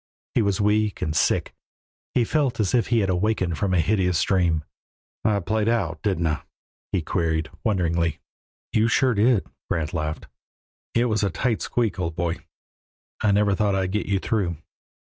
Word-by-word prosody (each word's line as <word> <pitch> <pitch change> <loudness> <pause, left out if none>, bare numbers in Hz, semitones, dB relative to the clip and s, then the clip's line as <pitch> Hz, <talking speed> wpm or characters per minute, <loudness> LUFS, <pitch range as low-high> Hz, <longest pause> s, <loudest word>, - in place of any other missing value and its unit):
He - - +3
was 100 -3 +1
weak 105 0 +1
and 75 - -2
sick; - - +1 0.6
he 125 - +4
felt 140 0 0
as 105 -4 +1
if 120 -2 +3
he 115 -2 +3
had 95 - 0
awakened 90 -4 0
from 95 - 0
a 90 - +3
hideous 90 -1 +2
dream. 85 -5 +2 0.6
"I 105 -2 +2
played 110 +4 0
out, 85 -10 0
didn't 95 -5 0
I?" 75 -2 0 0.5
he 95 -4 0
queried, 80 -1 -1
wonderingly. 85 -6 +1 0.5
"You 110 +1 +3
sure 130 +2 +3
did," 110 0 +3 0.2
Grant 80 0 -1
laughed. 80 -2 -3 0.7
"It 120 +1 +3
was 110 -2 +1
a 100 - +2
tight 115 +5 -1
squeak, 115 -5 -1
old 85 -2 -2
boy. 85 0 -1 0.8
I 105 - +3
never 100 0 +3
thought 100 0 +1
I'd 95 -1 0
get 105 +1 -1
you 100 -1 +2
through." 95 -5 -1
100 Hz, 170 wpm, -24 LUFS, 85-110 Hz, 0.8 s, he